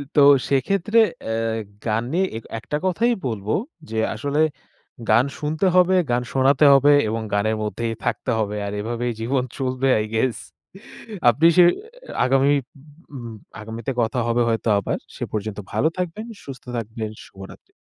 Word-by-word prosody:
তো 145 - +6 0.3
সেক্ষেত্রে 195 - +2 0.3
এ - - 0 0.5
গান 110 +1 0
নিয়ে 185 +3 +2
এ - - -2 0.2
একটা 150 +5 -3
কথাই 230 +6 +2
বলব 105 -5 -4 0.4
যে 110 - -4 0.2
আসলে 140 +7 -2 0.7
গান 115 +4 +5
শুনতে 155 +5 -1
হবে, 180 +1 +5 0.2
গান 120 0 +1
শোনাতে 135 +2 +4
হবে 140 +1 +6 0.2
এবং 110 +1 -2
গানের 110 +2 +1
মধ্যেই 115 +2 -2
থাকতে - - -1
হবে 105 -1 -1
আর 100 - -4
এভাবেই 120 +2 -2
জীবন 125 +3 0
চলবে 130 0 -1
আই 105 - 0
গেস। 115 +2 +1 0.9
আপনি 140 +8 +4
সে 180 - +8 0.6
আগামী 135 +2 +3 0.6
উম 120 -3 -7 0.3
আগামীতে 115 +4 -5
কথা 115 +2 0
হবে 120 +1 +2
হয়তো 115 0 -1
আবার। 100 - -2 0.2
সে - - -3
পর্যন্ত 105 -1 -4
ভালো 155 - +2
থাকবেন, 180 +5 -3 0.2
সুস্থ 135 -2 -9
থাকবেন, 110 -1 -4 0.2
শুভরাত্রি। 95 0 -13
120 Hz, 150 wpm, -22 LUFS, 110-145 Hz, 0.9 s, সে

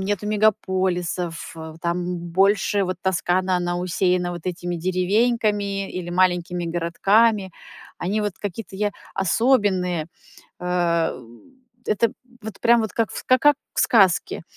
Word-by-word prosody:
нету 205 +1 -2
мегаполисов, 185 -5 0 0.3
там 175 0 -2
больше 195 +3 +2
вот 185 0 -3
Тоскана, 185 0 +1
она 175 0 -1
усеяна 180 0 0
вот 175 -2 -7
этими 175 -1 -3
деревеньками 200 +2 0
или 180 -1 -5
маленькими 175 -1 +1
городками. 195 +5 +2 0.5
Они 205 +4 -1
вот 205 -3 -2
какие-то 195 -1 -6
я 205 0 0 0.2
особенные. 190 -4 +1 0.6
Э, 175 -2 +1
м. 120 - -17 0.4
Это 215 +2 +1 0.3
вот 215 -2 -8
прям 235 0 +5
вот 220 - -4
как 230 -1 0
в - - -8
ска 255 - +3
ка 290 - +4
как 290 - -2 0.2
в - - +1
сказке. 195 -8 +3
185 Hz, 130 wpm, -22 LUFS, 175-205 Hz, 0.6 s, прям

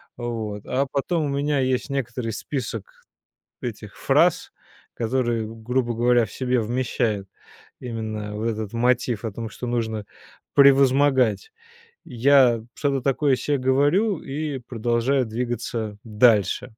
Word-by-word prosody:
Вот. 110 -4 -5
А 135 +2 0
потом 155 +3 0
у - - -2
меня 140 0 0
есть 130 +1 0
некоторый 125 -3 -3
список 115 -5 -6 0.6
этих - - -7
фраз, - - +2 0.4
которые, 120 -1 -1
грубо 120 +2 -2
говоря, 120 0 +3
в - - -13
себе 125 -1 0
вмещают 115 -3 -1 0.5
именно 110 -3 -5
вот 110 +2 -2
этот 110 -1 -4
мотив 120 -1 +1
о 110 - -2
том, 115 +2 -6
что 125 - -7
нужно 110 -3 -2 0.5
превозмогать. 140 - +4 0.5
Я 125 -2 +4
что-то 140 -2 0
такое 140 +1 +2
се 145 +2 -1
говорю 145 - +2
и 145 -1 -4
продолжаю 120 +2 0
двигаться 115 -2 -3
дальше. 105 -3 +3
120 Hz, 120 wpm, -23 LUFS, 115-135 Hz, 0.6 s, превозмогать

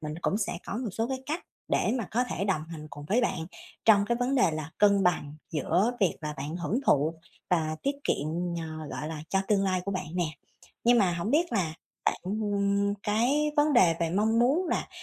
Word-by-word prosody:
mình 150 -1 -5
cũng 205 - +1
sẽ 210 - -1
có 200 - -3
một 240 -4 -3
số 225 +3 -1
cái 265 -1 -2
cách 320 +5 -3 0.2
để - - +2
mà 215 - -4
có 245 +3 +1
thể 195 - -3
đồng 185 -6 0
hành 155 -2 -8
cùng 145 - -9
với 230 +5 +3
bạn 170 -9 -1 0.4
trong 205 -2 +6
cái 235 - +1
vấn 250 +3 0
đề 245 -10 +4
là 155 0 -5
cân 200 -1 +5
bằng 150 -4 +1 0.2
giữa 175 - +1
việc 190 -4 +2
là 150 -1 -4
bạn 145 +5 -4
hưởng 205 +8 -1
thụ 150 +3 +3 0.4
và 155 -3 +1
tiết 280 +1 0
kiệm, 145 - 0 0.3
ờ, 155 -2 -6
gọi 150 - -4
là, 155 -2 -5
cho 195 - +2
tương 200 -2 +3
lai 185 -1 +1
của 200 - -2
bạn 185 -3 -3
nè. 180 -1 +1 0.6
Nhưng 240 0 +6
mà 185 -4 +3
hổng 175 +6 -2
biết 330 +1 +2
là 170 -7 0 0.3
bạn - - +1
ừm 200 0 0
cái 265 +8 +2
vấn 295 +1 +4
đề 185 -10 +5
về 165 -1 +1
mong 220 +5 +2
muốn 300 +9 +3
là, - - -1
200 Hz, 225 wpm, -28 LUFS, 165-235 Hz, 0.6 s, trong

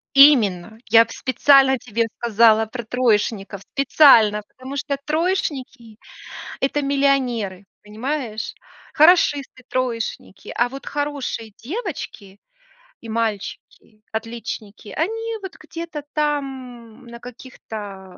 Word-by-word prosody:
Именно! 220 -7 +5
Я 230 +1 +7
в 225 - -13
специально 265 +1 +4
тебе 230 -1 -2
сказала 225 -1 +4
про 235 +2 -7
троечников. 215 -4 0
Специально! 230 -5 +5
Потому 260 +2 -9
что 280 0 -2
троечники- 290 - -2 0.6
это 285 +2 0
миллионеры. 255 -9 0 0.2
Понимаешь? 225 +1 -4 0.4
Хорошисты, 295 -6 +3
троечники. 235 -6 -4
А 240 +1 +2
вот 270 +2 -10
хорошие 285 -7 -4
девочки 265 - -6 0.6
и 230 - -10
мальчики, 215 -1 -4
отличники, 220 -2 -6
они 450 +6 -2
вот 380 -3 -8
где-то 320 -2 -7
там, 260 -5 -4
на 235 0 -11
каких-то 210 -6 -10
245 Hz, 100 wpm, -21 LUFS, 220-280 Hz, 0.6 s, Я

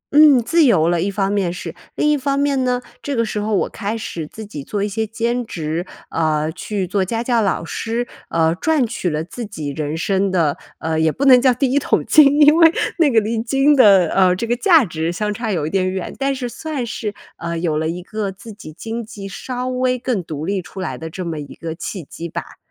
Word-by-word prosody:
嗯， 290 -6 +7
自 330 +7 +3
由 175 - +4
了， 170 -1 +1
一 200 - 0
方 195 0 -1
面 195 -4 0
是。 180 - -6 0.2
另 300 - +1
一 - - +4
方 275 0 -1
面 280 -2 +1
呢， 250 0 0 0.2
这 285 -2 -3
个 230 -1 +1
时 215 -1 -3
候 210 0 0
我 - - +1
开 215 +2 -4
始 165 -8 -5
自 220 +5 -9
己 150 -9 -7
做 205 +4 -3
一 - - 0
些 220 +2 -2
兼 235 +3 -1
职， 170 -3 -4 0.2
呃， 155 -1 0
去 190 +2 -3
做 190 +1 0
家 230 +5 -2
教 235 -2 +2
老 190 -4 0
师， 235 +5 -3 0.2
呃， 165 0 +2
赚 295 - +1
取 215 -6 -2
了 155 +1 -2
自 235 +7 -7
己 160 -9 -5
人 150 +2 -3
生 195 +2 +1
的 165 -6 +1 0.2
呃， 160 0 -2
也 160 -1 +3
不 280 - -2
能 255 -2 +8
叫 260 -1 +5
第 250 +1 0
一 285 - +3
桶 - - 0
金， 290 -1 +6
因 300 +2 +7
为 330 -1 +7 0.3
那 310 -4 +5
个 225 - +5
离 220 +1 -1
金 270 +5 +3
的， 195 -9 +6
呃， 185 -1 +3
这 230 - -3
个 240 +1 0
价 325 - +5
值 165 -1 -2
相 210 +3 -2
差 225 -1 -3
有 160 -5 -1
一 155 - -4
点 185 -1 +1
远， 190 -1 -4
但 275 0 0
是 250 -2 -3
算 285 0 -4
是， 215 -2 -4 0.2
呃， 170 0 -4
有 165 -2 -1
了 160 0 -1
一 175 +1 -5
个 210 -1 -3
自 200 +3 -11
己 175 -7 -11
经 225 +8 -5
济 205 -2 -9
稍 250 +6 -5
微 255 0 0
更 240 -7 -2
独 155 -1 -5
立 195 0 -1
出 175 +2 -11
来 185 - -3
的 160 0 -7
这 180 +2 -6
么 160 -2 -4
一 145 - -9
个 165 -1 -5
契 180 +1 -6
机 170 +4 -8
吧。 - - -7
205 Hz, 260 characters per minute, -19 LUFS, 170-245 Hz, 0.3 s, 能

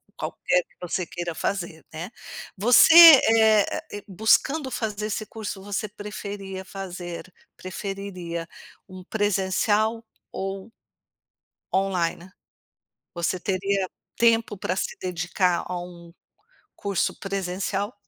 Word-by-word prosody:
qualquer - - 0
que - - -32
você 180 0 -3
queira 175 -1 -5
fazer, 170 -3 -3
né, 165 +6 -7 0.4
você, 240 - +6
eh 225 -10 +9
ah - - -3
eh, 205 -1 -7
buscando 260 - +2
fazer 215 -3 -3
esse 215 0 -3
curso, 205 -3 -7
você 205 +1 -3
preferia 200 -2 -7
fazer 180 -2 -8 0.2
preferiria 185 -3 -6 0.4
um 185 -1 -11
presencial 210 +3 0 0.3
ou 195 +3 -5 1.0
online? 185 -2 0 0.8
Você 175 +1 -1
teria 195 +1 -1 0.3
tempo 230 -3 +3
pra 185 - -2
se - - -3
dedicar 180 0 0
a 180 -1 -3
um 170 -1 -12 0.6
curso 200 -3 -1
presencial? 195 +2 -3
195 Hz, 105 wpm, -25 LUFS, 180-210 Hz, 1.0 s, eh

